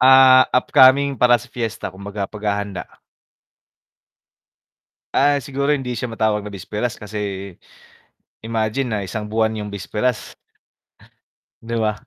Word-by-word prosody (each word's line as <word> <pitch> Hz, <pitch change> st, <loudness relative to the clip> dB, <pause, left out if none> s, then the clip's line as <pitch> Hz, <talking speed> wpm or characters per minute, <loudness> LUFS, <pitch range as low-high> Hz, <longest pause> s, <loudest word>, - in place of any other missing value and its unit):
Ah, 130 Hz, 0 st, +8 dB
upcoming 135 Hz, +2 st, +5 dB
para 120 Hz, 0 st, +4 dB
sa 125 Hz, -, -13 dB
fiesta, 115 Hz, -5 st, -4 dB
kumbaga 100 Hz, +1 st, -6 dB
paghahanda. 100 Hz, -3 st, -4 dB, 2.1 s
Ah, 145 Hz, +1 st, +3 dB
siguro 140 Hz, +1 st, -2 dB
hindi 130 Hz, -4 st, -1 dB
siya 120 Hz, +1 st, -4 dB
matawag 110 Hz, -2 st, 0 dB
na 105 Hz, -, -7 dB
bisperas 105 Hz, +4 st, -4 dB
kasi, 100 Hz, -2 st, -5 dB, 0.9 s
imagine 110 Hz, +3 st, -1 dB
na 110 Hz, -, -1 dB
isang 105 Hz, +3 st, -5 dB
buwan 110 Hz, +1 st, 0 dB
yung 105 Hz, -1 st, -5 dB
bisperas. 105 Hz, +2 st, -3 dB, 1.3 s
'Di 115 Hz, +1 st, -5 dB
ba? 105 Hz, -1 st, -2 dB
110 Hz, 115 wpm, -20 LUFS, 105-125 Hz, 2.1 s, Ah